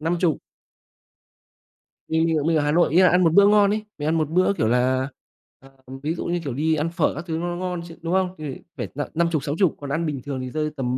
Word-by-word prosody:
50. 165 0 0 1.7
Mình 160 +1 +1
mình 165 -1 +1
mình 165 -1 +2
ở 150 - +1
Hà 145 - +1
Nội 170 -2 +3
ấy 185 - +7
ạ, 185 - +6
ăn 180 +1 +3
một 165 - +3
bữa 200 +2 +7
ngon 205 -1 +5
ấy, 215 0 -3
mình 145 - -3
ăn 160 - +2
một 155 -2 0
bữa, 185 +4 +2
kiểu 110 - 0
là 130 +2 +1 0.5
ờ, 135 - -17 0.3
ví 155 - 0
dụ - - -5
như, 175 0 -1
kiểu, 140 -5 -3
đi 155 +4 +1
ăn 155 +2 -1
phở 170 -1 0
các 155 +4 -6
thứ 160 -1 -2
nó 170 - -3
nó 175 - -3
ngon 180 -1 -3
chứ, 165 - -11
đúng 165 +1 -2
không? 185 -1 +1
Thì 150 -4 -6 0.2
phải - - -3
n - - -8
năm 170 +1 +2
chục, 155 -5 0
60, 160 +4 +1
còn 140 - -6
ăn 160 +4 -1
bình 145 -4 -3
thường 135 -2 -4
thì 130 - -5
rơi 155 +1 -1
tầm 125 -1 -1
160 Hz, 270 wpm, -23 LUFS, 145-175 Hz, 1.7 s, ấy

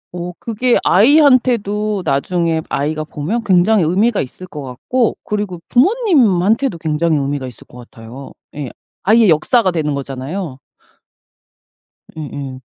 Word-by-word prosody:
어 175 0 -5
그게 235 +2 +1
아이한테도 215 - +3
나중에 165 +3 0
아이가 155 +2 -2
보면 170 +11 -4
굉장히 195 +1 +3
의미가 200 +8 +1
있을 160 +8 -8
것 150 -4 -9
같고 175 - -2
그리고 205 -5 -4
부모님한테도 255 - +2
굉장히 160 0 0
의미가 140 -1 -3
있을 125 - -13
것 125 - -15
같아요. 120 +3 -12 0.2
예 145 -3 -5 0.3
아이의 220 0 +4
역사가 185 +6 +3
되는 150 -4 -2
거잖아요. 140 +3 -6 1.6
예예. 140 -3 -7
175 Hz, 295 characters per minute, -17 LUFS, 145-220 Hz, 1.6 s, 아이의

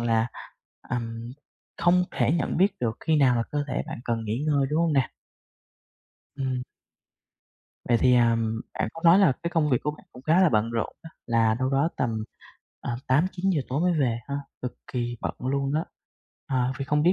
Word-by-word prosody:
là, 115 -1 +2 0.6
ừm, 115 -1 -4 0.4
không 180 +1 +4
thể 120 0 +1
nhận 165 -5 0
biết 195 +4 +4
được 115 -1 -1
khi 160 - +2
nào 130 -4 +4
là 115 - +2
cơ 145 -1 -1
thể - - -1
bạn - - -6
cần 115 -1 -1
nghỉ 110 +7 -2
ngơi, 140 -3 +2
đúng 155 - +2
hông 165 -2 +2
nè? 135 -3 +1 1.2
Ừm. 130 -2 -2 1.2
Vậy 120 - +3
thì, 125 -1 +5
ừm, 115 -2 +2 0.2
bạn - - 0
có 165 - -10
nói 170 +3 +8
là 190 -8 +5
cái 170 - -2
công 160 -4 +1
việc 125 - +4
của 150 - 0
bạn 150 +5 -14
cũng 125 - -12
khá 160 +6 +4
là 185 - +6
bận 110 -2 +1
rộn 115 -1 -2
á, 165 - -10 0.2
là 115 -1 +3
đâu 130 +1 0
đó 140 +4 +2
tầm, 115 -4 -1 0.6
à, 120 - -3
8:00-9:00 175 +5 +2
tối 135 +4 -1
mới 180 +1 +3
về 120 -4 +1
ha, 140 - -3 0.3
cực 125 - -3 0.2
kì 120 -1 -2
bận - - -3
luôn 135 +2 -1
đó. 160 +2 +1 0.6
Ờ, 130 -1 +1
vậy 135 - -2
không 150 +1 +1
biết 175 +3 +5
130 Hz, 200 wpm, -26 LUFS, 120-155 Hz, 1.2 s, nói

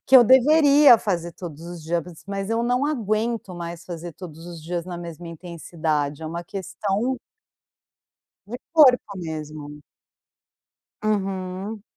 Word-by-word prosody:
que 265 - +8
eu 250 - +10
deveria 280 +2 +7
fazer 175 -5 -2
todos 165 -3 -9
os 175 -1 -8
dias, 170 +2 0
bas 170 0 -13
mas 195 0 -3
eu 225 +1 +1
não 250 +3 +1
aguento 225 -6 -1
mais 170 0 -7
fazer 170 -1 -7
todos 165 -1 -10
os 170 -2 -9
dias 170 +1 -3
na 180 -1 -6
mesma 170 0 -8
intensidade 160 -3 -3
é - - -4
uma 170 +2 -5
questão 205 +6 -2 1.3
de 240 +4 -6
corpo 260 -9 +6
mesmo. 155 -3 -7 1.2
Uhum. 195 0 -2
180 Hz, 135 wpm, -24 LUFS, 165-225 Hz, 1.3 s, eu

